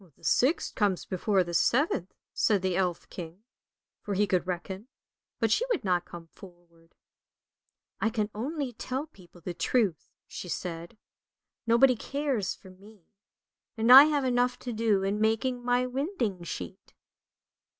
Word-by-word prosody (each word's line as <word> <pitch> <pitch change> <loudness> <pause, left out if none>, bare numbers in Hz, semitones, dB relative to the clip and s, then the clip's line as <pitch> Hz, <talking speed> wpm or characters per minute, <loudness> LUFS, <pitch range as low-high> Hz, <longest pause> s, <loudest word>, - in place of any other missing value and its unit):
" - - -31
" - - -44
The - - -27
sixth 275 +7 +2
comes 200 -5 0
before 190 +1 +1
the 175 0 -7
seventh," 235 - +1 0.2
said 205 -4 +1
the 185 -1 0
elf 180 -2 -1
king, 175 +3 -9 0.6
for 205 - -4
he 205 +2 +3
could 180 -2 0
reckon, 190 +4 -5 0.5
but 225 -2 +1
she 465 - +3
would 465 - 0
not 180 -2 +1
come 170 -1 -10
forward. 170 -1 -18 0.5
" - - -39
I 220 - +2
can 215 -2 -2
only 270 +3 -4
tell 260 +5 -4
people 180 - -19
the 175 +2 -5
truth," 195 -2 0 0.2
she 180 - -8
said. 170 +4 -5 0.3
" - - -58
Nobody 245 +3 +5
cares 270 -4 -2
for 190 - -15
me, 200 +1 -18 0.7
and 225 +2 +3
I 270 +3 +12
have 295 -3 0
enough 245 0 +1
to 245 - -5
do 215 -3 +1
in 200 +2 -1
making 245 +3 0
my 245 +1 +2
winding 255 - -2
sheet." 90 - -8
210 Hz, 160 wpm, -28 LUFS, 180-245 Hz, 0.7 s, I